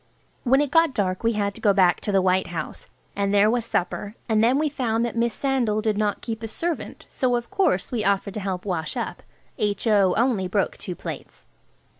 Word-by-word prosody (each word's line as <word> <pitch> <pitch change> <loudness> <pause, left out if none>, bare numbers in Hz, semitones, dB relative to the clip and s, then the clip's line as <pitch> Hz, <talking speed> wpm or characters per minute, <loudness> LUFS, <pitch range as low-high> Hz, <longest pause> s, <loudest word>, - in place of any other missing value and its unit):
When 265 +2 +4
it 290 -2 -1
got 325 -3 +4
dark 185 -1 -1
we 230 0 +2
had 200 -1 -1
to - - -13
go 205 -3 +4
back 185 -3 +3
to 205 - -2
the 195 -2 +3
White 185 0 +2
House, 165 -3 -6 0.3
and 200 0 0
there 205 +1 +4
was 235 -1 -1
supper, 200 +3 -2
and 220 -2 +2
then 245 +4 +4
we 305 +1 +1
found 240 -5 0
that 235 - -4
Miss 235 0 +1
Sandal 245 -4 0
did 215 -1 0
not 210 -1 -1
keep 225 -1 -4
a 225 - -4
servant, 330 +8 -4
so 250 -2 0
of 240 +6 -4
course 385 - +1
we 235 -4 -1
offered 200 -1 0
to 215 - -4
help 190 -2 -4
wash 165 -5 -2
up. - - -4 0.4
H.O. 205 -2 +2
only 225 -6 +1
broke 195 +1 0
two 180 - -5
plates. - - -8
215 Hz, 215 wpm, -24 LUFS, 195-240 Hz, 0.4 s, When